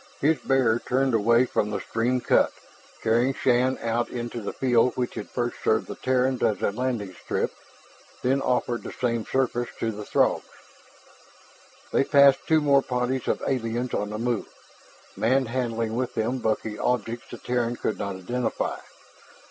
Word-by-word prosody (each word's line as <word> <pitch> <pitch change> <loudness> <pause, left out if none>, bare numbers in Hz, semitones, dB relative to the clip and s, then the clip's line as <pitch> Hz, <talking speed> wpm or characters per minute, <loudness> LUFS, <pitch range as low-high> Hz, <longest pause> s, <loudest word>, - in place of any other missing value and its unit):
His 150 0 +2
bearer 125 -3 +2
turned 130 +1 0
away 115 +3 +4
from 105 -4 0
the 105 - -2
stream 120 +2 -1
cut, - - +3 0.5
carrying 120 +4 +2
Shann 125 +1 +2
out 115 +1 0
into 120 -1 -5
that 100 - -5
field 125 -1 +3
which 125 -1 -1
had - - -6
first - - -2
served - - +2
the - - -6
Terrans 130 0 0
as 105 - +2
a - - +2
landing 115 -4 -2
strip, - - -2 0.7
then 135 +2 +2
offered 125 -2 0
the - - -7
same 115 -3 -2
service 120 -2 0
to 115 - 0
the 105 0 -7
Throgs. - - +2 1.5
They - - +4
passed 140 -1 +6
two 160 -1 +4
more 140 -2 +4
parties 125 0 -2
of - - 0
aliens 120 -1 -1
on 105 0 -1
the 105 - -4
move, 120 -1 -1 0.7
manhandling 115 -2 0
with 125 0 -2
them 120 +4 0
bulky 110 -1 -2
objects 120 -1 -1
the - - -7
Terran 120 -1 -1
could 110 - -3
not 100 -1 -3
identify. 120 +7 -2
120 Hz, 160 wpm, -25 LUFS, 115-130 Hz, 1.5 s, passed